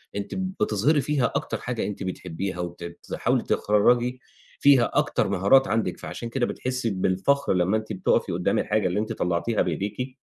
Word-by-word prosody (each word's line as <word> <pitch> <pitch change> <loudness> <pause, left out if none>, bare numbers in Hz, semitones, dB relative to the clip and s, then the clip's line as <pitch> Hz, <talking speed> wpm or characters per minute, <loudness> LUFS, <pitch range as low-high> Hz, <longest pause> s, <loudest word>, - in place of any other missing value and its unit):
أنتِ 100 0 -4
بتظهري 155 - +1
فيها 140 0 0
أكتر - - -2
حاجة 125 -3 -3
أنتِ 105 -1 -5
بتحبّيها 90 0 -4
وت 85 0 -5
بتحاولي 85 0 -2
تخرّجي 120 +4 +2 0.4
فيها 140 -4 +5
أكتر - - +1
مهارات 130 +9 +4
عندِك، 110 -5 -1
فعشان 120 - -6
كده 120 +1 0
بتحسّي 130 -2 -2
بالفخر 95 +8 +1
لمّا 90 +4 +2
أنتِ 110 0 -5
بتُقفي 95 - +1
قُدّام - - 0
الحاجة 105 -2 +1
اللي 90 +4 -1
أنتِ 110 - -2
طلّعتيها 90 +6 0
بإيديكِ، 125 +7 -3
110 Hz, 155 wpm, -25 LUFS, 95-125 Hz, 0.4 s, فيها